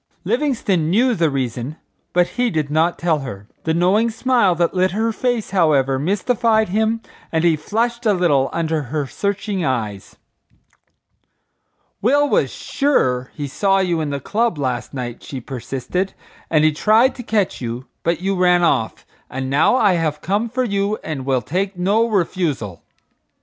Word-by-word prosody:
Livingstone 225 - 0
knew 240 +7 +3
the 170 -6 +2
reason, 130 0 -3 0.4
but 180 0 +2
he 245 -1 0
did 155 -7 -2
not 160 +3 +2
tell 165 -3 +1
her. 105 -7 -8 0.2
The 160 - +1
knowing 195 +7 +3
smile 235 -5 +2
that 170 0 +1
lit 185 0 +2
her 225 +2 0
face, 240 -2 -1
however, 140 -8 +2
mystified 220 - +1
him 220 +3 0 0.3
and 160 0 +1
he 170 -2 +4
flushed 235 +8 -1
a 210 - +4
little 150 -8 +2
under 160 -2 -1
her 150 0 -1
searching 200 +4 -2
eyes. 110 -8 -3 1.9
"Will 285 +6 +3
was - - +2
sure 130 - 0
he 145 -2 -4
saw 195 +7 +1
you 175 -4 +1
in 150 - -2
the 140 -1 -3
club 225 - 0
last 130 -4 -2
night," 125 -3 -5
she 135 - -7
persisted, 135 +9 -4 0.3
"and 155 -2 +3
he 155 - +5
tried 220 - +3
to 250 - -8
catch 215 - -1
you, 120 +1 -4 0.2
but 170 +1 -1
you 195 +1 0
ran 180 -1 +3
off; 115 -9 0 0.2
and 130 0 -4
now 150 - +4
I 210 -7 +4
have 160 -3 -1
come 205 +6 -1
for 255 +3 -1
you 200 -2 0
and 140 -4 -5
will 130 -2 +1
take 190 +3 -2
no 205 +6 +2
refusal." 165 - -1
175 Hz, 165 wpm, -20 LUFS, 145-215 Hz, 1.9 s, he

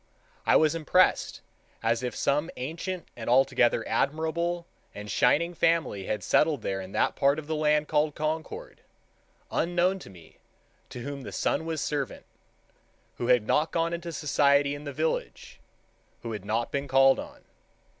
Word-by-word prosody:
I - - +5
was 155 -1 +4
impressed 165 +3 +2 0.4
as 115 +1 +1
if 125 -1 -4
some 150 +4 0
ancient 165 +7 -5
and 115 -1 -5
altogether 120 -2 +3
admirable 165 +4 -1 0.3
and 105 0 -7
shining 170 +3 +2
family 160 - +1
had 105 -3 -2
settled 150 - +2
there 95 0 -2
in 95 0 -9
that - - +1
part 140 +1 +3
of 155 - -6
the 160 +1 -2
land 150 0 +2
called 150 0 +1
Concord, 160 - -4 0.7
unknown 175 +2 +1
to - - -12
me—to 90 +6 -15
whom 140 +2 -6
the - - -8
sun 160 - -1
was 160 -3 -2
servant—who 140 -3 -7
had 125 -3 +4
not 155 +8 +2
gone 165 0 0
into 170 0 -5
society 140 -1 +2
in 145 +1 -8
the 145 - -4
village—who 145 -5 -6
had 105 -3 -6
not 115 +3 -1
been 140 0 -2
called 135 0 +5
on. - - -9
145 Hz, 150 wpm, -27 LUFS, 125-165 Hz, 0.7 s, I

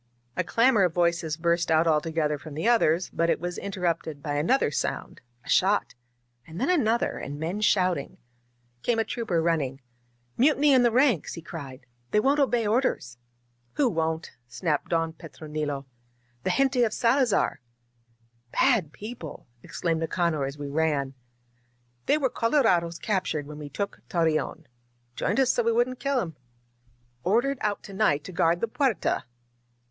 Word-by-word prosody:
A - - 0
clamor 230 -2 +3
of 180 -3 +2
voices 170 -3 +1
burst 170 0 +1
out 160 +1 +4
all 155 -2 +3
together 155 -2 -1
from 150 -1 -10
the 160 +9 -1
others, 185 -8 +3
but 170 0 +1
it - - +2
was 175 +1 -4
interrupted 170 -6 -3
by 145 - -2
another 155 - +2
sound - - -3
— 120 0 -36
a - - -16
shot, 200 +2 +2 0.5
and 160 +2 -8
then 270 +9 +2
another, 235 -9 +1
and 145 +1 -6
men 175 +7 -3
shouting. 185 -8 +1 0.6
Came 235 - +1
a 225 - +2
trooper 195 -9 -1
running. 145 -6 0 0.6
"Mutiny 290 +2 +4
in 260 - +6
the 240 - +5
ranks!" 245 - +2
he 165 - -7
cried. 135 -6 -9 0.2
They 210 - +3
won't 275 +6 +2
obey 245 -5 +2
orders 215 - 0 0.2
!" 120 0 -42
"Who 285 - +3
won't?" 160 -3 -2 0.2
snapped 150 +4 -2
Don 165 -1 0
Petronilo. 150 -3 -5 0.6
"The - - +2
gente 270 -2 +3
of 220 -2 +1
Salazar 245 - +2 0.4
!" 115 0 -40
"Bad 220 - +3
people 210 -7 -8
!" 120 - -38
exclaimed 165 +4 -2
Nicanor 165 -3 0
as 140 +2 -6
we 145 -1 -5
ran. 145 -2 0 0.9
"They 300 - +4
were 270 -4 0
colorados 190 - +2
captured 185 -9 -1
when 150 +1 -9
we 145 -1 -7
took 200 +7 -4
Torreon. 165 -1 0 0.5
Joined 205 +7 0
us 260 -1 +4
so - - +1
we 230 0 +2
wouldn't 245 +2 +1
kill 275 -2 0
'em. 165 - -4 0.9
Ordered 240 +8 +1
out 210 -1 -1
to 200 - -10
night 190 -8 +2
to 185 - -8
guard 170 0 +2
the 230 - +1
Puerta!" 245 - 0
170 Hz, 165 wpm, -26 LUFS, 155-230 Hz, 0.9 s, in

